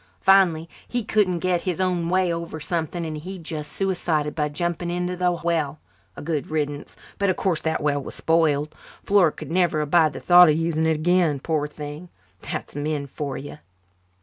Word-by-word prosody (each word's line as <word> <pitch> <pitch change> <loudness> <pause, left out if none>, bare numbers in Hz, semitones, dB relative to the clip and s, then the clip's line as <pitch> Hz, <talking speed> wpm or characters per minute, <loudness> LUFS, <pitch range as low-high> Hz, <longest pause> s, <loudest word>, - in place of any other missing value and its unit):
Finally 180 -4 +4 0.2
he 245 -1 -2
couldn't 205 -4 +1
get 180 -2 +1
his 185 -1 -3
own 180 -3 0
way 185 -1 +2
over 170 -1 -5
something 170 +1 -3
and 155 -1 -4
he 185 +5 -7
just 155 -3 -6
suicided 170 -6 -1
by 150 -1 -1
jumping 175 +3 -2
into 180 +1 -2
the 180 0 +1
well. 160 -4 0 0.4
A - - -7
good 150 -2 -2
riddance 145 -2 -3 0.2
but 200 -1 +2
of 185 - +2
course 180 -5 0
the 160 0 0
well 145 -1 0
was - - -8
spoiled. 155 -2 +1 0.3
Flora 195 -6 +4
could - - -9
never 175 -3 +2
abide 155 +1 +3
the - - -6
thought 175 -1 +7
of 155 - +3
using 160 -1 0
it 160 - +2
again, 165 -2 +2
poor 150 0 -1
thing. 150 +3 -8 0.3
That's - - -6
men 145 0 -2
for 140 0 -5
you. 145 +2 -8
165 Hz, 185 wpm, -23 LUFS, 150-180 Hz, 0.4 s, thought